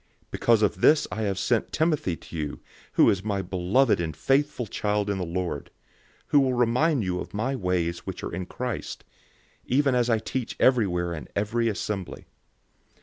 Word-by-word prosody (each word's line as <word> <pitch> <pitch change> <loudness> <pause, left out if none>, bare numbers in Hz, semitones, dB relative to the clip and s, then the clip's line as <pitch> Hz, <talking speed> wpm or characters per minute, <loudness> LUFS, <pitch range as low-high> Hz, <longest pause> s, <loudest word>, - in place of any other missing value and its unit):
004:017 - - -43
Because 115 -2 +3
of 95 -2 0
this 150 0 +5
I 110 - -3
have 100 -3 -1
sent 115 +4 0
Timothy 155 - +1
to 85 - -12
you, 75 -3 -4 0.3
who - - +5
is 95 -1 -2
my 100 -2 -1
beloved 95 +6 +2
and 80 -3 -4
faithful 135 - +1
child 105 0 -1
in 100 - -2
the - - -1
Lord, 85 -4 -3 0.6
who 145 - +5
will 130 -2 +2
remind 125 +3 +2
you 90 -1 -1
of - - -7
my 130 +6 -1
ways 90 -5 -1
which - - -7
are - - -5
in 90 - -4
Christ, 125 -2 -5 0.6
even 135 +1 +2
as 125 -1 +2
I 115 - +4
teach 120 +2 -4
everywhere 90 -9 +2
in 75 - -7
every 115 +3 +1
assembly. 100 -3 -4
105 Hz, 180 wpm, -26 LUFS, 90-125 Hz, 0.6 s, this